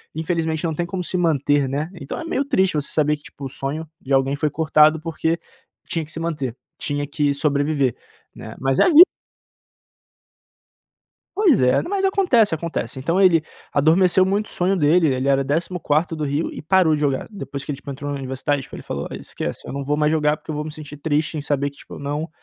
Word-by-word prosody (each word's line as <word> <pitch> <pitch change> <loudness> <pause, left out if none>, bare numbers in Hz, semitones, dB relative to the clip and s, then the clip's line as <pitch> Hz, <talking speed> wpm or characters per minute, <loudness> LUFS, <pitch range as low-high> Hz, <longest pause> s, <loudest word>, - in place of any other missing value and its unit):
infelizmente, 160 0 -1
não 160 - 0
tem 175 - -1
como 185 +1 -4
se 180 - -4
manter, 145 -4 +2
né? 145 +4 -2
Então 150 -6 -6
é 330 - -6
meio 305 -4 0
triste 190 -10 +2
você 145 -2 -1
saber 150 -1 +2
que 145 - -24
tipo 140 - -10
o - - -4
sonho 145 +5 -4
de 135 - -3
alguém 135 +1 +2
foi 150 +1 0
cortado 155 0 +4
porque 165 +1 -1 0.5
tinha 165 - -1
que 150 - -10
se 160 - -6
manter, 150 -8 -3 0.2
tinha 145 0 -3
que 145 0 0
sobreviver, 140 -2 +1 0.4
né? - - -9
Mas 135 0 0
é - - +7
a - - +4
vi 330 0 +10 2.3
Pois 375 - +4
é, 125 0 +4
mas 390 +2 -2
acontece, 360 - +3
acontece. 160 -4 -3
Então 165 +8 0
ele 180 -4 +5 0.3
adormeceu 180 +5 +4
muito 200 +3 0
o - - -11
sonho 185 +2 0
dele, 165 0 +4
ele 130 +1 -1
era 135 0 +3
14° 160 +2 0
do 155 -1 -2
Rio 145 +3 -1
e - - -7
parou 170 0 +3
de 150 - 0
jogar, 140 -3 0
depois 140 -8 -6
que - - -4
ele, 140 - -4
tipo, 140 - -10
entrou 145 +1 -5
na 140 - -3
universidade 135 +1 -2
tipo - - -11
ele - - -9
falou: - - -4
"Esquece, - - -6
eu - - -6
não 140 0 -3
vou 145 +2 0
mais 150 0 +2
jogar 150 -1 +2
porque - - -8
eu - - -4
vou 150 +1 -3
me 155 - -5
sentir 150 -1 -10
triste 155 +1 -1
em - - -3
saber 145 -1 -1
que, 140 - -21
tipo, - - -11
eu - - -9
não 145 +3 -3
155 Hz, 220 wpm, -22 LUFS, 140-170 Hz, 2.3 s, vi